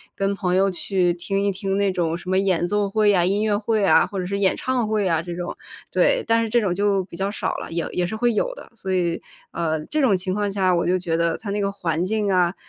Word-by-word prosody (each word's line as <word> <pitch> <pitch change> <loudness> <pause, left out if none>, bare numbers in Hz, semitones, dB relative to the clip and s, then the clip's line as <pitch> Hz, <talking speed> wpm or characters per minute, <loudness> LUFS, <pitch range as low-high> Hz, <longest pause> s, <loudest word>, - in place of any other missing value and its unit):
跟 195 0 0
朋 180 -2 0
友 195 +1 +3
去 180 -1 0
听 195 +3 -2
一 200 - +2
听 195 0 -2
那 200 -1 +2
种 170 -3 -1
什 180 +1 -9
么 185 - +2
演 185 -3 +1
奏 205 +1 0
会 210 +1 +3
呀、 180 -4 +3
音 200 +3 +1
乐 210 -2 +1
会 215 0 0
啊， - - +5
或 195 - -5
者 180 - -2
是 200 +1 -2
演 195 -2 +2
唱 250 -4 -1
会 215 -2 0
啊 165 -3 +1
这 175 - -6
种。 175 - -5 0.3
对， - - +3
但 230 0 +3
是 225 - -3
这 240 +1 +3
种 185 -4 0
就 200 0 +1
比 170 - -11
较 195 +1 -1
少 - - -2
了， - - -7
也 170 0 -2
也 180 - 0
是 180 - -4
会 240 +1 +1
有 - - 0
的。 - - -12
所 190 -4 -4
以 175 -2 0 0.3
呃， 160 -2 -2
这 305 - -1
种 245 -8 +4
情 185 0 -2
况 205 -1 -1
下， 190 -2 +2
我 170 - 0
就 185 +1 +2
觉 165 -2 -1
得 170 0 +1
它 210 - -8
那 205 - -1
个 200 -1 0
环 170 -3 -2
境 210 0 0
啊， 180 -2 +3
195 Hz, 295 characters per minute, -22 LUFS, 180-205 Hz, 0.3 s, 啊